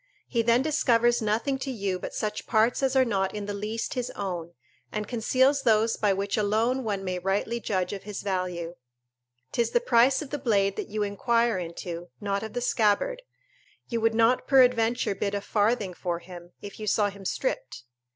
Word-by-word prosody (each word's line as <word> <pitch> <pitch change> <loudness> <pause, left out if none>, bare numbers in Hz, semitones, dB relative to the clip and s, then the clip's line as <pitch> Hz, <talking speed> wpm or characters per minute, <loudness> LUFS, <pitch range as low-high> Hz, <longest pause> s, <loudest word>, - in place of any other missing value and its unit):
He 235 - +1
then 235 +2 +3
discovers 240 -6 +2
nothing 230 +6 0
to 270 - -4
you 200 -7 -2
but - - -6
such 210 -1 -3
parts 225 +3 +2
as 270 -1 +1
are 260 -1 +5
not 195 -4 -1
in 205 -1 -4
the 205 - -4
least 210 +3 -3
his 250 -2 -2
own, 175 -4 -4 0.4
and 210 -1 -3
conceals 260 +4 +2
those 225 -2 +3
by 205 -2 +1
which 195 +2 -1
alone 225 +5 +1
one 200 -3 -2
may 185 -1 -2
rightly 200 +5 -1
judge 185 -4 -1
of 195 - -5
his 210 -1 -7
value. 180 -3 -2 0.8
'Tis 235 -1 +1
the 485 - +3
price 265 - +3
of 275 - -12
the 290 - -2
blade 200 -6 +2
that - - -4
you 210 0 -2
inquire 230 +1 +1
into, 170 0 -6
not 200 -1 -1
of 220 -1 -6
the 245 - -2
scabbard: 245 - +1 0.7
you 230 -2 -1
would 225 0 +2
not 230 +2 +3
peradventure 245 -5 +4
bid 200 +1 -2
a - - 0
farthing 205 -2 0
for 175 0 -3
him, 175 0 -12
if 205 +1 -9
you 215 - -5
saw 205 0 +2
him 200 0 -12
stripped. - - -3
215 Hz, 190 wpm, -27 LUFS, 195-240 Hz, 0.8 s, are